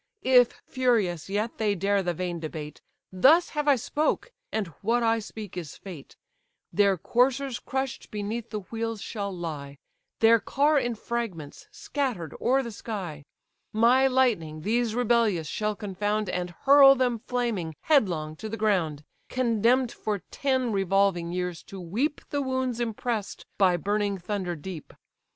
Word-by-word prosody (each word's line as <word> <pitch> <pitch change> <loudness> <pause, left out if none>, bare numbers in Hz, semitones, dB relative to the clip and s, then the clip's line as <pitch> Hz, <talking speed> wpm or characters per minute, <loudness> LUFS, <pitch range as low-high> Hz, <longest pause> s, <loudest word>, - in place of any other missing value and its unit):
If 250 -2 +5
furious 215 - 0
yet 210 +3 -2
they 210 -2 +1
dare 200 +2 +1
the 175 -2 -2
vain 175 0 -3
debate, 155 -1 -7 0.3
Thus 300 - +5
have 300 -1 -2
I 285 - +6
spoke, 300 - -1 0.2
and 220 - -1 0.2
what 235 +3 +1
I 225 0 +3
speak 215 -2 -8
is 170 -5 -6
fate: 175 -8 -10 0.6
Their 200 -2 +3
coursers 255 - +1
crush'd 265 -1 -4
beneath 215 +2 -4
the 210 -2 -4
wheels 225 +2 -4
shall 200 -3 -4
lie, 150 -6 -6 0.4
Their 230 0 +6
car 290 +6 +2
in 240 -3 -2
fragments, 215 -11 -5
scatter'd 245 - -3
o'er 265 +2 +3
the 235 - -6
sky: 185 -10 -6 0.5
My 240 +5 +5
lightning 220 -13 +1
these 230 +2 0
rebellious 230 -8 +2
shall 210 +4 -2
confound, 205 +1 -2
And 180 0 -2
hurl 275 +7 +7
them 245 -3 +1
flaming, 220 -10 -2
headlong, 175 - +2
to 220 - -6
the 225 - -4
ground, 175 -9 0 0.3
Condemn'd 240 0 +2
for 210 -3 -3
ten 260 -4 0
revolving 195 -3 +1
years 180 -1 -3
to 195 - -9
weep 225 - -2
The 285 - 0
wounds 260 -2 -1
impress'd 225 -2 -3
by 185 -3 +4
burning 205 +2 0
thunder 185 -1 -3
deep. 160 +1 -8
215 Hz, 145 wpm, -27 LUFS, 180-245 Hz, 0.6 s, hurl